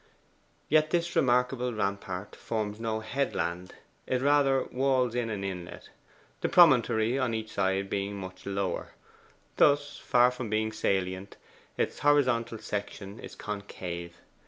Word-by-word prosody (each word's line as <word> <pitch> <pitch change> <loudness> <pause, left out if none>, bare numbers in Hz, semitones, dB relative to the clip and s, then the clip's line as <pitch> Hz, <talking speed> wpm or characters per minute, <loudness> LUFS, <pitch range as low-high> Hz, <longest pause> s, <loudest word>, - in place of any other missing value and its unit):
Yet 155 +1 +4
this 175 0 0
remarkable 125 -1 +2
rampart 100 -2 -3
forms 105 -1 -3
no 110 -1 -2
headland: 90 -8 -2 0.3
it 130 0 0
rather 140 -2 +4
walls 130 -2 +1
in 120 -2 -1
an 105 -3 -3
inlet 90 -3 -6 0.5
the - - -1
promontory 125 -7 +5
on 125 -4 0
each 110 0 -5
side 95 0 0
being 100 +1 -2
much 95 -1 -8
lower. 95 -2 -2 0.6
Thus, 145 0 +3
far 125 0 +4
from 125 -3 -5
being 110 +1 0
salient, 95 -2 -2 0.4
its - - -1
horizontal 125 -6 +2
section 100 0 -5
is - - -9
concave. 90 -4 -6
110 Hz, 130 wpm, -29 LUFS, 100-130 Hz, 0.6 s, promontory